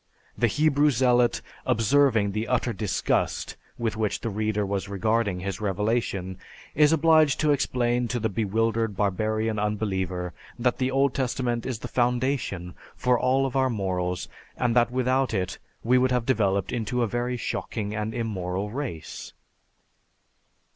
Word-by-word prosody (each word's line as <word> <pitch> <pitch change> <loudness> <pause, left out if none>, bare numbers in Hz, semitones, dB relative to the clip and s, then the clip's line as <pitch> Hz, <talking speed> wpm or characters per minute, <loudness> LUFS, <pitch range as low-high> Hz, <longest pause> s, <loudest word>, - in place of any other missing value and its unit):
The 120 - +2
Hebrew 150 +3 +3
Zealot, 125 -2 +2 0.2
observing 115 -2 +3
the 110 +3 -2
utter 125 -1 0
disgust 100 -1 -1 0.2
with 115 -2 -1
which 105 -2 -1
the 115 - -3
reader 105 0 -1
was 100 -2 -3
regarding 100 -2 0
his 100 +1 -4
revelation, 100 -2 -1 0.3
is 150 +1 +5
obliged 160 -3 +4
to 155 -1 +3
explain 125 -3 +1
to 120 +1 -2
the 110 - 0
bewildered 110 0 0
barbarian 110 +2 0
unbeliever 95 -4 -2 0.2
that 125 0 0
the 130 0 +1
Old 135 0 +2
Testament 125 -3 -1
is 130 -3 -2
the 120 - -7
foundation 120 -7 -1 0.2
for 125 -1 +2
all 130 +2 +2
of 135 - -4
our 130 -1 +3
morals 90 -5 -2 0.3
and 120 -1 +1
that 120 -1 +4
without 130 0 +1
it 90 -2 -2 0.2
we 125 +2 +4
would 130 +1 +3
have 125 -2 0
developed 100 -7 +1
into 120 +1 -1
a - - +1
very 120 +2 -2
shocking 105 -3 -3
and 110 +1 -3
immoral 100 -3 -3
race. 120 - -6
115 Hz, 145 wpm, -26 LUFS, 100-125 Hz, 0.3 s, is